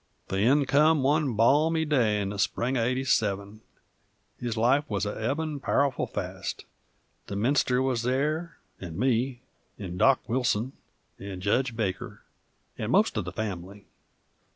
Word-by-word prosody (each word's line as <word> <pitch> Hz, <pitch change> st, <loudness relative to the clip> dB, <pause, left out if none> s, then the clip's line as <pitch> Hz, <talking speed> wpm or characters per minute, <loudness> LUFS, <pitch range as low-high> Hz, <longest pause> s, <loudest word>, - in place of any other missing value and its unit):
The 95 Hz, -, -1 dB
end 135 Hz, +6 st, +3 dB
come 150 Hz, +1 st, +4 dB
one 145 Hz, -3 st, +2 dB
balmy 155 Hz, +8 st, +3 dB
day 120 Hz, -9 st, +2 dB
in 100 Hz, -1 st, -2 dB
the 100 Hz, 0 st, -6 dB
spring 120 Hz, +6 st, 0 dB
uv 120 Hz, -3 st, +1 dB
'87. 110 Hz, -5 st, 0 dB, 0.8 s
His 120 Hz, -2 st, -3 dB
life 125 Hz, +6 st, +3 dB
wuz 100 Hz, -2 st, -1 dB
a 105 Hz, -, -2 dB
ebbin' 145 Hz, +6 st, -2 dB
powerful 140 Hz, -1 st, +1 dB
fast; -, -, -5 dB, 0.6 s
the 100 Hz, -, -5 dB
minister 125 Hz, +3 st, +2 dB
wuz 130 Hz, -2 st, 0 dB
there, 150 Hz, +7 st, -1 dB, 0.3 s
'nd 85 Hz, -2 st, -7 dB
me, 125 Hz, +1 st, 0 dB, 0.4 s
'nd 90 Hz, -3 st, -6 dB
Dock 135 Hz, +2 st, +3 dB
Wilson, 120 Hz, 0 st, 0 dB, 0.5 s
'nd 95 Hz, -2 st, -7 dB
Jedge 120 Hz, +4 st, +1 dB
Baker, 100 Hz, -5 st, -4 dB, 0.6 s
'nd -, -, -2 dB
most -, -, +3 dB
uv -, -, -2 dB
the -, -, -5 dB
fam'ly. 100 Hz, -1 st, -6 dB
125 Hz, 145 wpm, -27 LUFS, 105-135 Hz, 0.8 s, come